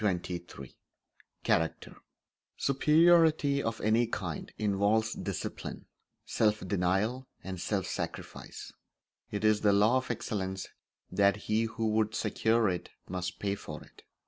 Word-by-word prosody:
Chapter 90 -3 0
XXIII 85 -7 -8 0.7
Character 80 0 0 0.6
Superiority 155 0 +4
of 115 -2 -2
any 115 +3 +3
kind 90 -8 -4
involves 105 +2 +2
discipline, - - -5 0.4
self 105 -3 +1
denial, 100 +8 0 0.2
and 95 -2 -5
self 95 -2 -1
sacrifice. - - -6 0.6
It 105 0 -4
is 110 -1 +4
the 105 -1 +4
law 105 +5 +5
of 130 - -3
excellence 95 -4 -3 0.4
that 100 0 +4
he 110 +2 0
who 115 0 -2
would 110 0 +1
secure 110 +1 +2
it 90 -2 -2 0.2
must 90 0 -4
pay 100 -1 -1
for 100 - -7
it. - - -19
105 Hz, 125 wpm, -30 LUFS, 95-115 Hz, 0.7 s, law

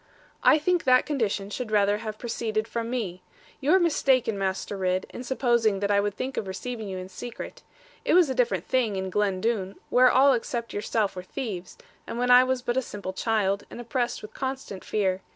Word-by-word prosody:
'I 310 - +6
think 350 +3 +1
that 255 -1 +5
condition 210 -8 -1
should 245 +1 -4
rather 205 -1 +3
have 215 -1 -5
proceeded 225 -2 -2
from 230 0 -3
me. 200 -8 -3 0.4
You 285 +2 +1
are - - +6
mistaken, 265 - +2
Master 195 +1 -2
Ridd, 185 -1 0
in 245 - -7
supposing 235 -5 +2
that 200 +1 0
I 200 - +4
would 205 0 -1
think 260 +1 -4
of 200 - -2
receiving 220 +2 -5
you 190 - -4
in 185 0 -6
secret. 230 +5 -8 0.4
It - - +3
was 360 -3 +6
a 265 - -1
different 215 -8 +1
thing 240 -6 +1
in 190 0 -3
Glen 195 -2 0
Doone, 200 -4 -1 0.2
where 255 +1 +6
all 270 +2 +5
except 235 -1 -3
yourself 210 -1 -1
were 180 - -4
thieves, 190 -3 -6 0.3
and - - -5
when 250 +1 +2
I 250 +1 +9
was 255 -1 -1
but 240 0 -1
a - - +3
simple 200 -6 -6
child, 200 -2 0
and - - -9
oppressed 240 0 -2
with 215 - -9
constant 260 -7 -5
fear. 190 -3 0
225 Hz, 205 wpm, -26 LUFS, 200-255 Hz, 0.4 s, I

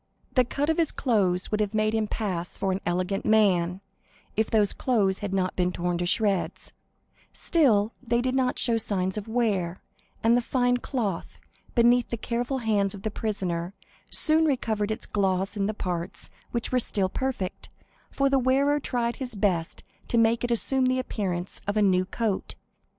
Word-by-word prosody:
The 255 - +5
cut 280 +4 -2
of 320 - -1
his 330 -3 +2
clothes 195 -7 +1
would 210 - 0
have 210 0 -1
made 215 0 +2
him 220 -1 +1
pass 185 -6 -3
for 195 - 0
an 190 - -2
elegant 185 +3 -1
man, 190 -4 +3 0.5
if 220 +1 +1
those 210 -3 +3
clothes 205 -7 +1
had 205 -1 -4
not 185 -1 0
been 180 0 +1
torn 175 -1 -2
to 175 - -1
shreds; 200 -1 0 0.6
still 230 - +2
they 235 -2 0
did 255 +1 0
not 260 -1 +1
show 235 -2 +2
signs 190 -4 -1
of 210 0 -5
wear, 205 -7 0 0.4
and 230 +1 +5
the 245 - +3
fine 245 0 +1
cloth, 225 -8 -3 0.4
beneath 240 0 +4
the 235 - -3
careful 245 +4 -2
hands 210 -4 +1
of 195 - -11
the 215 - -2
prisoner, 190 -5 -3 0.3
soon 320 0 +3
recovered 220 -7 0
its 220 - -3
gloss 195 0 0
in 200 -1 0
the - - 0
parts 175 -2 -5 0.2
which 235 -1 -3
were 255 - +3
still 200 -5 0
perfect, 245 -3 -4 0.4
for 275 - +1
the 275 0 +3
wearer 275 +3 +2
tried 240 -3 -2
his 250 -4 -6
best 185 -5 -1 0.2
to 235 - 0
make 230 +1 +3
it 245 - 0
assume 255 +3 +2
the 255 0 +2
appearance 190 -8 -3
of 205 +1 0
a - - +4
new 185 -2 +3
coat. 210 +1 -2
215 Hz, 180 wpm, -26 LUFS, 190-245 Hz, 0.6 s, The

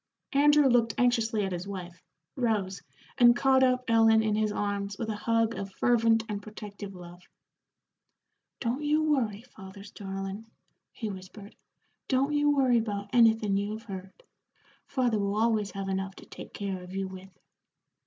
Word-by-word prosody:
Andrew 290 0 +5
looked 235 -3 +2
anxiously 230 -4 +2
at 190 - -4
his 180 +1 -4
wife, 180 -3 -7 0.3
rose, 210 -7 -1 0.4
and 240 -1 +7
caught 265 +1 +3
up 255 -1 +3
Ellen 225 -1 +5
in 215 -1 0
his 215 0 +1
arms 200 -1 -3
with 225 +1 -4
a 215 - -2
hug 230 +1 +1
of 195 -3 -6
fervent 230 -2 +3
and 205 -1 -4
protective 205 -2 -9
love. 175 0 -11 1.4
"Don't 245 +3 -2
you 300 +1 +2
worry, 235 -9 0
father's 200 -4 -12
darlin'," 195 +2 -6 0.4
he 220 -4 -5
whispered. 195 +2 -11 0.5
"Don't 275 +2 +1
you 295 0 +3
worry 260 -4 +3
about 205 -2 -4
anythin' 225 -4 +4
you 205 +1 -2
have 220 +1 -7
heard. 190 - -9 0.6
Father 245 -5 0
will 200 0 -1
always 215 -2 +1
have 195 0 -5
enough 190 0 -3
to - - -13
take - - -11
care 195 -2 -4
of 180 +1 -10
you 195 0 -2
with." 190 0 -10
215 Hz, 160 wpm, -28 LUFS, 195-240 Hz, 1.4 s, and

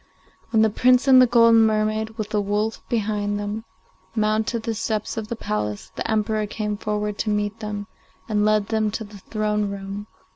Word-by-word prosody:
When 220 -1 +4
the 220 - +3
Prince 250 +4 +4
and 260 -1 +8
the 255 - +6
golden 230 -1 +6
mermaid, 215 +1 0
with 215 -2 -3
the 210 - +1
wolf 210 +2 -1
behind 205 -2 -1
them, 205 +2 -4 0.5
mounted 220 +1 0
the 230 - -1
steps 215 0 -2
of 220 -2 -4
the 235 - -3
palace, 105 - -3
the - - -3
Emperor 215 -1 0
came 210 0 -3
forward 210 0 -3
to 215 - -1
meet 210 +1 -1
them, 210 -1 -4 0.4
and 210 -2 +1
led 210 -1 +2
them 220 -1 +1
to 220 +2 -4
the 205 -1 -12
throne 210 0 -1
room. 200 +1 -6
215 Hz, 185 wpm, -23 LUFS, 205-220 Hz, 0.5 s, and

